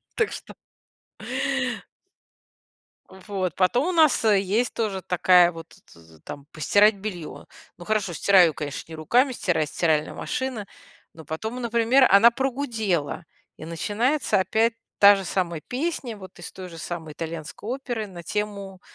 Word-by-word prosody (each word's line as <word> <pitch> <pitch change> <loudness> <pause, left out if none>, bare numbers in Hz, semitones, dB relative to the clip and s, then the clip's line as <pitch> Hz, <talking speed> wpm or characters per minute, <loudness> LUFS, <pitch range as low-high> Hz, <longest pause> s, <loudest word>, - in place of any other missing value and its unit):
Так 445 - 0
что - - -9 2.6
Вот, 190 -2 -4
потом 240 - +2
у - - +1
нас, 315 -9 +3
э, 210 -3 +5
есть 210 +5 0
тоже 205 -4 -2
такая 180 -1 +4
вот, 165 -1 -10
т - - -20 0.2
т 80 -1 -19
там 140 - -9
постирать 205 +7 +3
белье. 190 -5 -7 0.3
Ну, 175 - -11
хорошо, 210 -4 -1
стираю, 180 -2 +5
конечно, 150 +2 -6
не - - -6
руками, 240 - +2
стирает 170 - -1
стиральная 155 -3 0
машина, 255 -5 -4 0.5
но 160 - -12
потом, 220 - -5
например, 235 +3 +3
она 210 +5 +7
прогудела. 225 - -2 0.3
И - - -9
начинается 210 - 0
опять 220 +5 +1 0.2
та 205 0 +8
же 195 - -4
самая 175 -4 -2
песня, 260 - -4
вот 190 -2 -13
из 175 - -8
той 185 -1 -9
же 170 -2 -11
самой 160 -2 -6
итальянской 165 +6 -7
оперы 245 -4 -4
на 175 -3 -10
тему, 200 -1 -4
195 Hz, 145 wpm, -24 LUFS, 170-230 Hz, 2.6 s, та